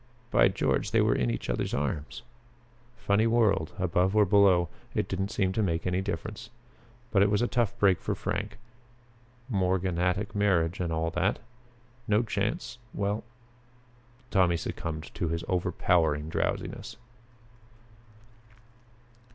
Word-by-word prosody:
By - - +6
George, - - 0
they - - +3
were - - +3
in 60 - 0
each - - -3
other's - - -1
arms! 75 +5 -3 0.7
Funny 110 0 +2
world 105 -8 +2
above 90 +1 +1
or 105 -1 +6
below 95 -3 +4 0.3
it - - 0
didn't 95 +1 -2
seem 95 -3 0
to 110 - 0
make 85 -5 -1
any 90 +1 0
difference. 95 +4 -5 0.6
But 100 - +4
it 100 - +5
was 105 +3 +2
a - - +2
tough 120 -5 0
break 95 -3 +3
for - - -2
Frank 100 0 -3 0.9
morganatic 95 -1 0
marriage 95 -4 +1
and 85 -2 -1
all 80 0 -1
that. 90 +4 +1 0.7
No 105 +2 +3
chance 120 +2 -3 0.2
well 100 +2 -1 1.1
Tommy 90 -4 +3
succumbed 80 -1 -5
to 85 - -2
his 85 +1 -2
overpowering 80 -4 +1
drowsiness. - - -3
95 Hz, 130 wpm, -28 LUFS, 85-105 Hz, 1.1 s, By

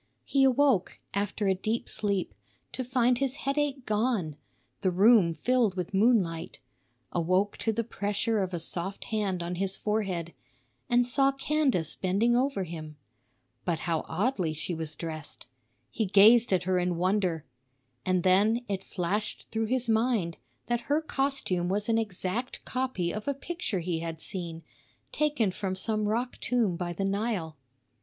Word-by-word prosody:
He 275 -1 +3
awoke, 265 -6 +3
after 205 +1 -1
a 190 - +4
deep 215 +5 -2
sleep, 200 -3 0 0.4
to 260 - -4
find 250 -1 +2
his 275 -1 0
headache 280 -2 0
gone, 210 - 0 0.5
the 190 - +2
room 195 0 +5
filled 235 +2 +1
with 180 +2 -3
moonlight; 190 -6 +2 0.5
awoke 185 +4 +1
to 225 - 0
the 230 +2 -1
pressure 210 0 -1
of 185 -1 -2
a 175 - -2
soft 175 +3 -4
hand 200 -5 -1
on 175 +1 -3
his 195 0 0
forehead, 195 -6 -2 0.6
and 245 0 +4
saw 270 +3 +3
Candace 275 - +1
bending 200 +6 +1
over 255 -5 +1
him. 155 -3 -8 0.7
But 170 -3 -1
how 165 -2 -1
oddly 185 -4 0
she 175 - -3
was 160 -2 -4
dressed! 160 -3 -6 0.5
He 220 - -1
gazed 220 +5 +6
at 185 -1 +2
her 185 0 +1
in 175 -1 0
wonder. 180 -3 0 0.6
And 185 -1 +1
then 210 +6 +3
it 195 -2 -3
flashed 195 +4 -3
through 225 0 0
his 250 +1 +1
mind 220 -7 +1 0.3
that 240 -1 0
her 295 +2 +4
costume 270 - -1
was 205 +3 0
an 225 0 +3
exact 215 +3 -3
copy 255 -10 -1
of 215 +3 -6
a 280 - 0
picture 275 - -3
he 165 -1 -2
had 165 -1 -5
seen, 170 -3 -5 0.5
taken 295 -10 +1
from 190 -1 -3
some 215 +2 -1
rock 240 +3 -2
tomb 230 -8 +1
by 175 0 -3
the 195 +3 -2
Nile. 195 -5 -1
205 Hz, 155 wpm, -28 LUFS, 180-240 Hz, 0.7 s, gazed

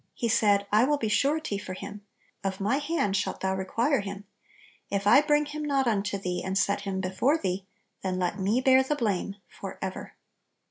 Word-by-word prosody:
He 235 - -1
said, 205 -2 +3
"I 215 +2 +5
will 295 +3 +2
be 225 -6 -2
surety 280 -3 +1
for 185 -2 -6
him; 205 +2 -8 0.4
of 195 -1 -2
my 210 +7 +1
hand 290 -9 0
shalt 190 - -2
thou 190 0 0
require 230 +9 +1
him: 200 0 -6 0.7
if 200 0 -1
I 210 +7 +7
bring 300 0 +2
him 300 +1 -6
not 275 -2 +1
unto 205 -3 0
thee, 180 -2 -3
and 190 +1 -1
set 200 0 +1
him 190 -1 -3
before 190 - +1
thee, 190 - -3 0.3
then 185 -1 -2
let 185 +3 -1
me 205 +6 +1
bear 260 0 +6
the 265 +3 -1
blame 200 -6 -1
forever." 190 -1 -7
205 Hz, 190 wpm, -27 LUFS, 190-265 Hz, 0.7 s, I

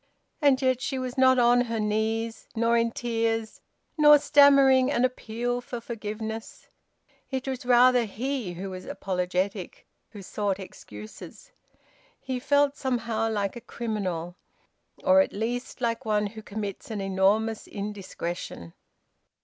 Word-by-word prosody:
And 280 -3 +4
yet 255 -1 +2
she 270 - -2
was 255 -1 -4
not 260 -1 +5
on 245 0 +5
her 230 -1 -3
knees, 220 +2 -1
nor 230 +1 +2
in 230 0 +2
tears, 225 -1 -2 0.4
nor 295 0 +9
stammering 275 -3 +6
an 245 -2 +2
appeal 245 0 -3
for 245 0 -6
forgiveness. 220 -1 -6 0.6
It 265 -1 -3
was 260 -2 -4
rather 250 0 +5
he 235 -2 -3
who 190 +2 -6
was 185 0 -8
apologetic, 185 +1 -3 0.2
who 205 -3 -10
sought 200 0 -2
excuses. 110 - -11 0.7
He 260 -1 -4
felt 285 +1 +2
somehow 230 -4 -1
like 205 -2 -2
a 240 - -8
criminal, 190 -8 -4 0.7
or 285 0 +6
at - - -2
least 240 +4 -4
like 230 -1 -1
one 210 -1 +1
who 220 +2 -7
commits 205 -1 -6
an 215 -2 -4
enormous 195 +3 +1
indiscretion. 190 - -6
225 Hz, 135 wpm, -26 LUFS, 205-255 Hz, 0.7 s, nor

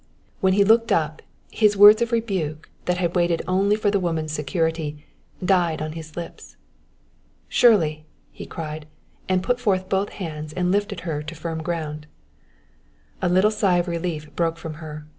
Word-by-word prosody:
When 190 -1 +3
he 200 +1 +4
looked 225 +3 +4
up, 155 -1 0 0.3
his 210 -2 +3
words 210 +3 +9
of 235 +1 0
rebuke, 190 -10 -2
that 180 0 0
had 175 -1 -1
waited 175 -1 +1
only 195 +3 +2
for 210 -1 +1
the 200 - +2
woman's 165 -4 -2
security, 155 0 -2 0.4
died 175 -4 +2
on 155 0 -4
his 160 0 -9
lips. 170 -1 -8 0.9
"Shirley!" 155 -10 +3 0.2
he - - -10
cried; 155 -1 -6 0.4
and 185 -1 +2
put 245 +3 0
forth 190 -6 0
both 195 +1 0
hands 155 -4 -6
and 180 +1 0
lifted 200 -2 -1
her 160 -4 -3
to 160 +2 -8
firm 160 0 -4
ground. 155 -2 -4 1.1
A 180 - +1
little 185 +4 +4
sigh 195 -4 +2
of 175 +1 0
relief 165 -3 -4
broke 165 -1 0
from 160 -1 -7
her. 150 -1 -8
170 Hz, 165 wpm, -23 LUFS, 155-195 Hz, 1.1 s, words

